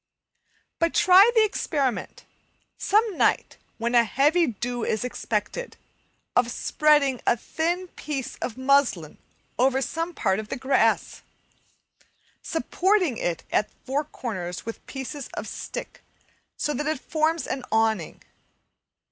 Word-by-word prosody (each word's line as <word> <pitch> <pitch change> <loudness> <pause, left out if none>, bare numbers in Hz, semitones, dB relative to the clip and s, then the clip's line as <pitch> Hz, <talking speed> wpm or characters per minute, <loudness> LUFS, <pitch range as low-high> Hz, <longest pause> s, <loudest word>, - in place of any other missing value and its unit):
But 335 0 +1
try 375 +4 +7
the 445 - +6
experiment, 280 - -2 0.5
some 425 -1 +2
night - - +2 0.2
when 235 +1 -2
a 240 -1 +6
heavy 295 +9 +3
dew 240 +1 -3
is 220 - -1
expected, 240 - -3 0.6
of 245 -1 +3
spreading 280 0 +2
a 235 - +4
thin 345 +9 -2
piece 280 -6 -5
of 240 - -5
muslin 260 - +2 0.4
over 265 +1 +3
some 330 +5 -3
part 190 -1 +1
of 215 0 -7
the - - -3
grass, 265 +2 +1 1.2
supporting 355 - +1
it 170 -2 -2
at 210 - +1
the - - -33
four 275 +3 0
corners 185 -12 -5
with 230 - -7
pieces 270 +1 -6
of - - -5
stick - - -7 0.6
so 295 - -1
that 295 +1 -2
it 310 -3 -1
forms 315 +3 0
an 265 - -4
awning. 220 -6 0
270 Hz, 130 wpm, -25 LUFS, 235-320 Hz, 1.2 s, try